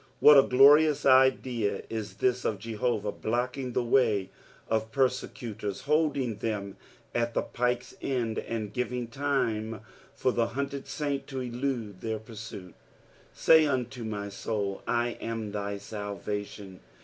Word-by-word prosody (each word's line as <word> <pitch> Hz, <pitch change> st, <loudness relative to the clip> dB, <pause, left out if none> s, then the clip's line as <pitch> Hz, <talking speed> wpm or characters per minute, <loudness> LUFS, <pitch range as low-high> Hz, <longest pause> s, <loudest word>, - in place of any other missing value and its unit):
What 150 Hz, -, +9 dB
a 135 Hz, -, +10 dB
glorious 145 Hz, +3 st, +6 dB
idea 130 Hz, -4 st, +3 dB
is 105 Hz, -4 st, -5 dB
this 125 Hz, +3 st, +1 dB
of 105 Hz, -, 0 dB
Jehovah 110 Hz, 0 st, -2 dB
blocking 125 Hz, +4 st, -2 dB
the 125 Hz, -, +1 dB
way 110 Hz, -6 st, +2 dB, 0.4 s
of 110 Hz, 0 st, -1 dB
persecutors, 115 Hz, -5 st, -2 dB
holding 145 Hz, -6 st, +1 dB
them 100 Hz, -3 st, -3 dB, 0.4 s
at 120 Hz, 0 st, -1 dB
the -, -, +1 dB
pike's 125 Hz, 0 st, -1 dB
end, 120 Hz, -5 st, -1 dB
and 110 Hz, -3 st, -4 dB
giving 125 Hz, -1 st, -2 dB
time 115 Hz, -5 st, -1 dB, 0.3 s
for 130 Hz, -, +1 dB
the 120 Hz, -1 st, +1 dB
hunted 140 Hz, 0 st, -3 dB
saint 145 Hz, -2 st, -3 dB
to 135 Hz, -2 st, -4 dB
elude 120 Hz, -5 st, -3 dB
their 110 Hz, -1 st, -2 dB
pursuit 110 Hz, -5 st, -9 dB
I -, -, -31 dB, 0.3 s
" -, -, -29 dB
Say 160 Hz, -1 st, +6 dB
unto 125 Hz, -3 st, -2 dB
my 105 Hz, -2 st, -4 dB
Kml, 100 Hz, -1 st, -3 dB
I 120 Hz, 0 st, +1 dB
am 115 Hz, -2 st, -4 dB
thy 100 Hz, 0 st, -3 dB
tatvation." 100 Hz, -1 st, -6 dB
115 Hz, 140 wpm, -28 LUFS, 105-130 Hz, 0.4 s, a